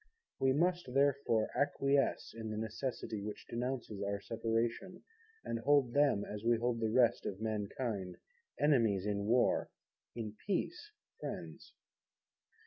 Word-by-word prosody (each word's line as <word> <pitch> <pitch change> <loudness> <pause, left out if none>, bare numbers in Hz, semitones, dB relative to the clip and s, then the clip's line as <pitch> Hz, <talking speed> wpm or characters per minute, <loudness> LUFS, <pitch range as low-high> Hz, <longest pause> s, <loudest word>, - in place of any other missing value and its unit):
We 135 - +4
must, 175 -2 +1
therefore, 140 -5 +2
acquiesce 140 -1 +1
in 110 -1 -5
the 110 - -3
necessity, 110 -1 -3
which 105 +1 -6
denounces 120 -4 -3
our 100 0 -1
Separation, 115 - -2 0.4
and 115 - -2
hold 135 -1 +3
them, 140 -8 +3
as 105 0 -6
we 120 0 +4
hold 120 0 0
the 110 -1 +1
rest 120 0 +3
of 95 - -4
mankind, 105 -2 -3 0.4
Enemies 115 -10 +3
in 100 -1 -1
War, 120 +2 +3 0.5
in 110 -3 -5
Peace 355 - -2 0.3
Friends. - - -7
115 Hz, 130 wpm, -35 LUFS, 110-135 Hz, 0.5 s, We